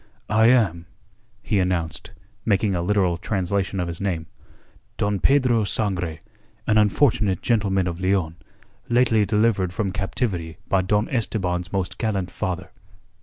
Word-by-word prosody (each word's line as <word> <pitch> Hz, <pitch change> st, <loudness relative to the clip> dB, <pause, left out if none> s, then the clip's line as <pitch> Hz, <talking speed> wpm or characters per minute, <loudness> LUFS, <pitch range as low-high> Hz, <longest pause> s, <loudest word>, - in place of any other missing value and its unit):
"I 110 Hz, +1 st, +5 dB
am," 100 Hz, -9 st, +3 dB, 0.6 s
he 100 Hz, -, +1 dB
announced, 90 Hz, -3 st, -2 dB, 0.3 s
making 100 Hz, -1 st, +1 dB
a 90 Hz, -, 0 dB
literal 90 Hz, -2 st, +1 dB
translation 95 Hz, +1 st, -1 dB
of 90 Hz, -, -1 dB
his 85 Hz, +1 st, -6 dB
name, 90 Hz, -5 st, -2 dB, 0.7 s
"Don 100 Hz, -1 st, 0 dB
Pedro 125 Hz, -4 st, +3 dB
Sangre, 90 Hz, -6 st, -1 dB, 0.4 s
an 110 Hz, -1 st, +3 dB
unfortunate 105 Hz, -, +2 dB
gentleman 100 Hz, -6 st, +1 dB
of 85 Hz, +1 st, -4 dB
Leon, 90 Hz, -4 st, 0 dB, 0.5 s
lately 120 Hz, -4 st, +3 dB
delivered 105 Hz, -4 st, +1 dB
from 100 Hz, -1 st, -1 dB
captivity 90 Hz, -3 st, -3 dB
by 95 Hz, -, +2 dB
Don 105 Hz, +3 st, +1 dB
Esteban's 90 Hz, -7 st, -2 dB
most 95 Hz, -2 st, -3 dB
gallant 100 Hz, -5 st, -1 dB
father." 90 Hz, 0 st, -4 dB
95 Hz, 130 wpm, -23 LUFS, 90-110 Hz, 0.7 s, I